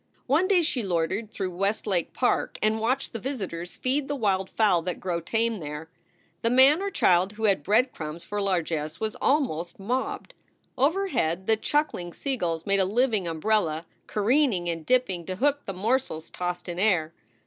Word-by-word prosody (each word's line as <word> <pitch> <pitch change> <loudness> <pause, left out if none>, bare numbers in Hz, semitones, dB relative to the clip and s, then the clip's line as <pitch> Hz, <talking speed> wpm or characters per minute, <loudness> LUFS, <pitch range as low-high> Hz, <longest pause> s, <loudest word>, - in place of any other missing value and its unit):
One 310 +8 +3
day 370 -3 +4
she 285 -6 0
loitered 190 +3 -1
through 190 -3 -4
Westlake 195 -1 0
Park 250 - 0
and 215 +1 +2
watched 255 +5 -1
the 230 - -4
visitors 190 -10 -5
feed 270 +2 0
the 290 - -2
wild 195 -6 0
fowl 200 -6 +3
that 180 +1 -4
grow 175 -2 -2
tame 225 +4 0
there. 150 +1 -7 0.5
The 230 - +2
man 265 +7 +6
or 400 - -1
child 185 - +3
who 220 +1 -8
had 200 -6 +3
bread 225 - +3
crumbs 155 +1 -6
for 205 0 -3
largess 165 -5 -1
was 220 -1 -2
almost 175 - 0
mobbed. 245 +7 -3 0.4
Overhead 270 - +1
the 220 - +4
chuckling 220 - -1
seagulls 175 - -2
made 200 -1 +2
a 190 - +3
living 215 -2 +1
umbrella, 165 -1 0 0.2
careening 215 -4 +2
and 165 -1 -3
dipping 245 -9 +2
to 185 - -3
hook 285 +6 +1
the - - -2
morsels 205 -4 -1
tossed 180 0 -4
in 175 0 -4
air. 175 -6 +2
200 Hz, 170 wpm, -26 LUFS, 175-255 Hz, 0.5 s, man